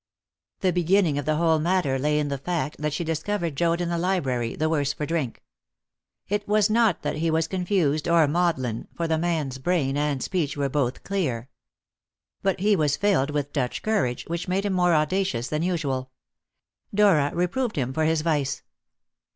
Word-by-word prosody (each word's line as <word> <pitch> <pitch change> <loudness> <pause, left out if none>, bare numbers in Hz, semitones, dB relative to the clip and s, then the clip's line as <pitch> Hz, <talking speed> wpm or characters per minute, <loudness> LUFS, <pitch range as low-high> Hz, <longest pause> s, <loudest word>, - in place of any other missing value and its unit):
The 185 -2 +2
beginning 175 -3 +2
of 145 - -4
the 155 0 +1
whole 160 0 +3
matter 165 -5 +1
lay 150 +2 +1
in 150 -1 0
the 140 -1 -3
fact 155 -1 -2
that 150 0 -1
she 155 +4 -2
discovered 165 0 -2
Joad 170 +3 +1
in 175 - -1
the 170 -1 -1
library 135 -11 -1
the 155 - 0
worse 145 -3 0
for 150 - -4
drink. 155 -6 -3 0.8
It 205 +1 -2
was 210 0 +3
not 225 -5 +2
that - - -2
he 165 +1 0
was 160 0 +1
confused 175 -5 0
or 170 -2 +4
maudlin, 145 -8 0
for 170 - -1
the 160 -1 +1
man's 155 -6 -1
brain 140 -3 0
and 145 -2 0
speech 155 -6 -1
were 140 -1 0
both 130 -3 -1
clear. 130 -12 -2 0.9
But 195 -1 0
he 205 +1 +4
was 150 -5 +1
filled 190 -9 +2
with 145 -1 -2
Dutch 125 -4 -2
courage, 200 - 0
which 170 +2 -4
made 190 +3 0
him 200 - 0
more 180 -2 +3
audacious 155 -5 0
than 155 0 -1
usual. 145 -7 -1 0.8
Dora 195 -9 +4
reproved 200 +7 -1
him 130 -3 -1
for 155 +2 +1
his 160 0 +2
vice. 150 -4 -1
160 Hz, 185 wpm, -25 LUFS, 145-180 Hz, 0.9 s, or